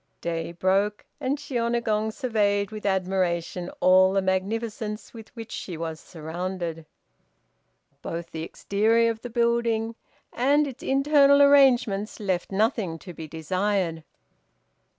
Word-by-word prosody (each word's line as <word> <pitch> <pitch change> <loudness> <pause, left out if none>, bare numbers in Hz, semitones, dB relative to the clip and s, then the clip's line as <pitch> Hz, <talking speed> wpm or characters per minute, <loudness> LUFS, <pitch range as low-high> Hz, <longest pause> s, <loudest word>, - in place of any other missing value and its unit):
Day 165 0 -3
broke, 195 +4 0
and 280 0 -1
Shiônagon 235 -5 -1
surveyed 210 -5 0
with 215 -1 -5
admiration 180 -2 -1
all 185 +1 +5
the 195 - +2
magnificence 210 +3 -2
with 225 -2 -11
which 230 -1 -8
she 175 -4 -6
was 160 -1 -5
surrounded. 165 0 -5 1.1
Both 170 0 -6
the 160 - -5
exterior 220 +7 +1
of 225 0 -8
the 245 - -6
building 235 -1 +1 0.4
and 285 +4 +3
its 270 -4 -8
internal 280 +1 +4
arrangements 250 -8 +4
left 190 -4 -2
nothing 200 -4 0
to 175 +3 -10
be 160 -1 -8
desired. 175 +1 -1
205 Hz, 120 wpm, -25 LUFS, 180-230 Hz, 1.1 s, all